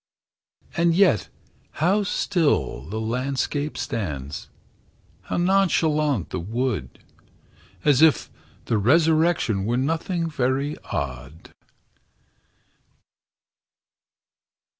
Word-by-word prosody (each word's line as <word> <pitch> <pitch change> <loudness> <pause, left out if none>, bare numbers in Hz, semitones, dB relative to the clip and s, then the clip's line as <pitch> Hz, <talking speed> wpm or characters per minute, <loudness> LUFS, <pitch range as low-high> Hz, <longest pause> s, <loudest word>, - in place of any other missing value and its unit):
And 170 -1 +2
yet 175 - +3 0.4
how 190 +6 +2
still 160 - 0
the 110 +3 -3
landscape 135 +5 -2
stands, 75 - -4 0.8
How - - -3
nonchalant 160 - +2
the - - -2
wood, 110 - -3 0.9
As 145 -2 +4
if 160 -2 +4 0.3
the 110 - +1
resurrection 155 - +3
Were 120 +4 0
nothing 165 +5 -1
very 140 0 -1
odd! 70 +3 -6
135 Hz, 75 wpm, -24 LUFS, 105-165 Hz, 0.9 s, As